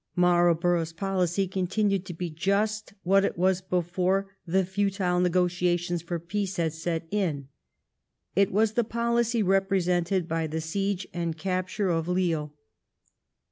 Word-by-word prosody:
Marlborough's 175 -1 +3
policy 190 0 0
continued 190 +1 0
to 175 - -5
be 175 0 -4
just 200 +6 -1
what 195 +2 +4
it - - -1
was 185 +1 +2
before 185 +2 -1
the 190 +2 +2
futile 190 -1 0
negotiations 175 -1 +1
for 170 +1 -3
peace 195 +3 -3
had 165 -2 0
set 165 0 -3
in. 160 -10 -1 0.9
It 200 0 +3
was 215 +2 +3
the 240 - +2
policy 235 0 0
represented 185 -2 +1
by 165 -1 -1
the 160 +1 -3
siege 195 +4 -2
and 170 -2 -2
capture 185 +3 -1
of 165 -1 0
Lille. 170 -5 0
180 Hz, 135 wpm, -27 LUFS, 170-195 Hz, 0.9 s, what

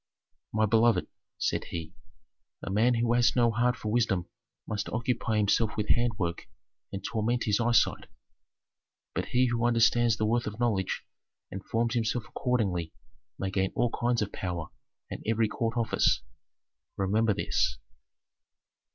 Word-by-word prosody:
"My 110 0 +2
beloved," 115 +2 +3 0.3
said - - -1
he, 80 -2 -6 0.7
"a - - -4
man 115 +5 +3
who 115 0 +1
has 120 -1 +3
no 120 -2 +4
heart 120 +2 +2
for 105 - -4
wisdom 110 -6 +1 0.4
must 105 -1 -3
occupy 115 -1 -1
himself 105 +2 +2
with 105 -1 -2
handwork 105 -8 0 0.4
and 95 - -5
torment 115 +2 0
his 105 -1 +1
eyesight. 120 0 +2 1.1
But - - -2
he 125 +1 +3
who 120 0 0
understands 120 -1 +3
the 110 - 0
worth 120 +2 +1
of 105 +1 -6
knowledge 110 -6 0 0.5
and 95 0 -6
forms 115 0 0
himself 115 0 0
accordingly 95 -10 -1 0.4
may 95 -1 -3
gain 95 0 0
all 120 - +1
kinds 120 -2 0
of 100 - -6
power 85 -3 -4 0.4
and - - -5
every 115 0 +2
court 115 +2 -2
office. 115 -1 +2 0.7
Remember 105 +2 +2
this. - - 0
115 Hz, 140 wpm, -29 LUFS, 105-120 Hz, 1.1 s, no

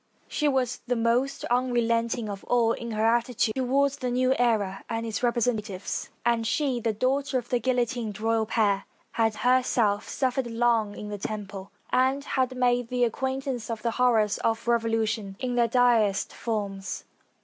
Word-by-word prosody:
She 300 - 0
was 260 -3 0
the 245 - +1
most 240 +4 0
unrelenting 235 -2 +1
of 200 -1 -6
all 235 -2 +3
in 235 0 -4
her 215 +1 +1
attitude 235 -1 +2
toward 270 +3 +2
the 260 -2 -4
new 255 +1 +2
era 210 -5 +1
and 230 0 -2
its 220 -2 -3
representatives, 230 -5 -1 0.2
and 230 -1 +2
she, 265 0 0
the 230 -1 0
daughter 260 +5 0
of 240 -1 -5
the 245 - +1
guillotined 240 -3 -1
royal 225 0 +1
pair, 205 -3 +1 0.3
had 225 -1 +1
herself 240 -4 +2
suffered 260 -1 -1
long 230 -3 +1
in 210 - -7
the 205 -1 -5
Temple, 200 -2 -6 0.2
and 265 +2 +2
had 260 -2 -1
made 245 -1 +2
the 250 0 0
acquaintance 260 0 -2
of 225 -2 -4
the 235 - +1
horrors 225 -4 +2
of 225 +1 -1
revolution 225 -3 0
in 255 -1 -2
their 240 -1 +3
direst 230 -5 +2
forms. 200 -4 -4
235 Hz, 160 wpm, -26 LUFS, 220-250 Hz, 0.3 s, all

